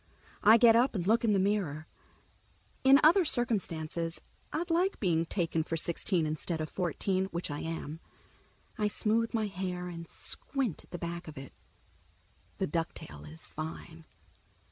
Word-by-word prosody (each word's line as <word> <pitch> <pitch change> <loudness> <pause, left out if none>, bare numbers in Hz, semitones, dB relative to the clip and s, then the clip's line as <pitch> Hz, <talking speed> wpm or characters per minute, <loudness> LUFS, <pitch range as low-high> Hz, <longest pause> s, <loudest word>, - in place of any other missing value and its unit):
I 220 +2 +8
get 230 -1 +7
up 240 +1 +3
and 175 -3 -1
look 225 +4 +3
in 225 - +3
the - - +3
mirror. 190 -6 0 1.0
In 270 +1 +8
other 340 +5 +7
circumstances 170 - 0 0.3
I'd 335 +3 -2
like 360 +4 +2
being 165 -4 +1
taken 165 -3 0
for 165 +1 -3
sixteen 170 +1 0
instead 155 +2 -2
of 155 -1 -4
fourteen, 185 +2 0
which 170 -4 -4
I 145 - -3
am. 160 -1 -5 0.8
I 210 - +2
smooth 225 +2 +1
my 220 -1 +1
hair 180 -2 -4
and 170 -1 -8
squint 260 - -4
at - - -31
the 175 - -5
back 170 +1 -5
of 155 - -9
it. 135 0 -9 1.0
The 190 - 0
ducktail 80 - -4
is 80 - -6
fine. 160 +1 -7
180 Hz, 155 wpm, -31 LUFS, 165-220 Hz, 1.0 s, I